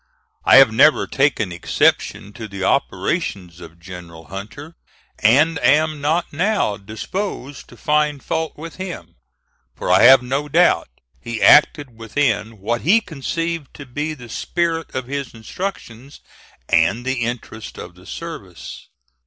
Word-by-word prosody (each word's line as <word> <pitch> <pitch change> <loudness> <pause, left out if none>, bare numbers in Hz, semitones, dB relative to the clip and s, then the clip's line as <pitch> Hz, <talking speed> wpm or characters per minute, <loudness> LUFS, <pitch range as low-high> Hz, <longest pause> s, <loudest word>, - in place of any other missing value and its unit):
I - - +7
have 135 -3 +8
never 150 +6 +5
taken 135 -9 0
exception 95 +3 0
to 110 0 -8
the 100 -2 -6
operations 90 -2 -1
of 80 0 -12
General 85 -2 -11
Hunter, 110 - -9 0.4
and 145 +8 +4
am 150 +4 +2
not 160 +4 0
now 185 - 0
disposed 130 - -6
to - - -15
find 150 -2 0
fault 160 0 -3
with 165 +1 -9
him, 165 - -7 0.6
for - - -2
I 95 - +5
have 130 +1 +8
no 135 +4 -2
doubt 135 - +3 0.3
he 115 +6 -5
acted 145 -4 +5
within 115 -2 -1
what 115 +4 -2
he 200 +9 +4
conceived 165 - -4
to 140 - -9
be 150 +5 -4
the 120 -4 -12
spirit 165 +4 -2
of 130 -1 -3
his 140 -2 -5
instructions 130 - -7 0.5
and 95 +9 +2
the 130 -2 -1
interests 115 -2 -5
of 85 - -9
the 90 +1 -18
service. 130 - -9
130 Hz, 140 wpm, -20 LUFS, 105-155 Hz, 0.6 s, have